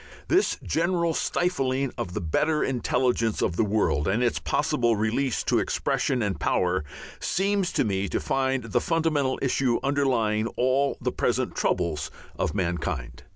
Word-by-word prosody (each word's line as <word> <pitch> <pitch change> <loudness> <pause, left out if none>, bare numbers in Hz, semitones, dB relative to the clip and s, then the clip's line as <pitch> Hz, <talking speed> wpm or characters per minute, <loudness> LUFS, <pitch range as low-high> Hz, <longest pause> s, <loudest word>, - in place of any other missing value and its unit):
This 380 +4 +3
general 170 0 +1
stifling 135 -8 0
of 90 - -5
the - - -2
better 150 - +1
intelligence 125 -3 0
of 85 - 0
the 110 - +2
world 100 -8 +1
and 110 +6 +1
its 120 - +1
possible 120 -2 +1
release 110 +4 0
to - - +2
expression 125 -4 0
and 95 -6 -2
power, 90 -1 +1 0.4
seems 195 0 0
to - - +2
me 100 -3 -1
to - - -1
be 135 0 0
the - - +1
fundamental 155 -5 +1
issue 130 -2 +1
underlying 120 -6 +1
all 130 +3 +2
the - - -1
present - - -1
troubles 80 -4 0 0.3
of - - -2
mankind. 85 -9 -2
125 Hz, 150 wpm, -26 LUFS, 105-140 Hz, 0.4 s, This